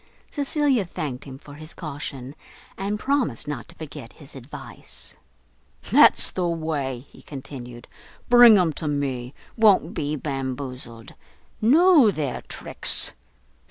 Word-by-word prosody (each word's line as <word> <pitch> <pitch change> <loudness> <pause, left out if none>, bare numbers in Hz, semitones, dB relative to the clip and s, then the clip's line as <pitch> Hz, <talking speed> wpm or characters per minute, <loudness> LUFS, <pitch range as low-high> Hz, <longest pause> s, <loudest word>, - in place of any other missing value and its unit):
Cecilia 285 -5 +1
thanked 155 -8 -6
him 135 -2 -9
for 145 +1 -14
his 155 +2 -10
caution, 140 -4 -7 0.4
and 205 +2 -3
promised 260 - -1
not 140 -5 -5
to - - -15
forget 135 -6 -10
his 145 -2 -14
advice. 135 +1 -8 0.8
"That's - - +6
the 180 -2 -1
way," 150 -6 -3
he - - -16
continued, 125 -4 -10 0.4
"bring 240 -3 +8
'em 175 -4 +2
to 155 - -3
me. 135 -3 -3 0.2
Won't 220 -4 +4
be 145 +1 -2
bamboozled. 130 -4 -6 0.5
Know 300 - +6
their 150 -9 -3
tricks. - - +2
150 Hz, 125 wpm, -23 LUFS, 130-200 Hz, 0.8 s, bring